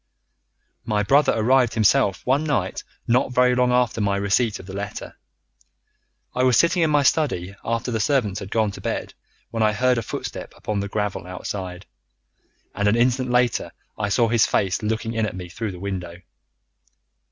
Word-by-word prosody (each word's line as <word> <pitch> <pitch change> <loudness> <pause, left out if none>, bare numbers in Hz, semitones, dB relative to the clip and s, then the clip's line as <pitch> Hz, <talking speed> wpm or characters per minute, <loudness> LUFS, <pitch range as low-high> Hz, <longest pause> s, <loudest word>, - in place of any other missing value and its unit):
"My 105 -1 0
brother 140 +8 +4
arrived 120 +1 +3
himself 110 -1 +2
one 135 +4 +2
night 130 -12 -1 0.2
not 125 +2 +2
very 125 0 +4
long 125 0 +2
after 125 -2 +1
my 100 -1 +1
receipt 100 +3 +1
of - - -11
the 95 - -9
letter. 100 +1 -6 1.2
I 125 - -1
was 130 -2 +4
sitting 170 +1 +3
in 160 - +3
my 145 -1 +3
study 115 - +1
after 115 +2 -2
the 110 - -1
servants 110 -6 +1
had 95 - -8
gone 110 -1 +1
to - - -10
bed, - - -3 0.4
when 115 - -2
I 110 -1 +3
heard 125 +3 +2
a - - -2
footstep 110 - -6
upon 105 -1 -3
the 100 - -2
gravel 105 -3 -3
outside, 90 0 -6 0.9
and 105 - 0
an 105 - +4
instant 125 +2 +1
later 125 0 +1 0.2
I 105 -1 -2
saw 115 +4 +3
his 115 -1 +3
face 95 -2 0
looking 110 +1 -2
in 110 -1 0
at - - -6
me 90 -1 -7
through 105 +3 -4
the 90 - -9
window. 90 -3 -6
110 Hz, 180 wpm, -23 LUFS, 100-125 Hz, 1.2 s, brother